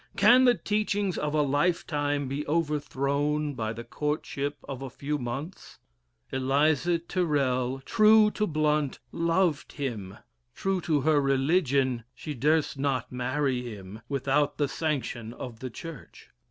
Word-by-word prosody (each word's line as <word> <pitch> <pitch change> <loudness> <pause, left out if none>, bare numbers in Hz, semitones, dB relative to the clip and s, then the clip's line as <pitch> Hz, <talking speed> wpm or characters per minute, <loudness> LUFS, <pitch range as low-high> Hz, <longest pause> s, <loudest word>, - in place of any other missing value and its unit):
Can 255 +2 +7
the 245 -1 +6
teachings 205 -3 -1
of 150 0 -2
a 150 - +3
lifetime 145 -1 0
be 140 +3 -3
overthrown 150 -1 0
by 110 -4 -3
the 115 +1 -6
courtship 145 +1 -3
of 135 -2 -6
a 135 - -5
few 145 +4 -3
months? 135 +8 -6 0.5
Eliza 145 +5 +2
Tyrrel, 140 -7 0
true 215 +5 +5
to 210 0 -1
Blount, 150 -2 +1
loved 170 -2 +1
him; 110 -9 -4 0.4
true 195 -1 -1
to 155 -4 +1
her 150 +1 +3
religion, 135 -3 +2
she 150 - -6
durst 150 +1 +1
not 135 -2 -1
marry 130 +1 -1
him 105 -3 -8
without 140 +1 +1
the 145 - +1
sanction 135 -7 -3
of 120 -4 -8
the 130 - -5
Church. 160 +2 -10
145 Hz, 135 wpm, -28 LUFS, 130-160 Hz, 0.5 s, Can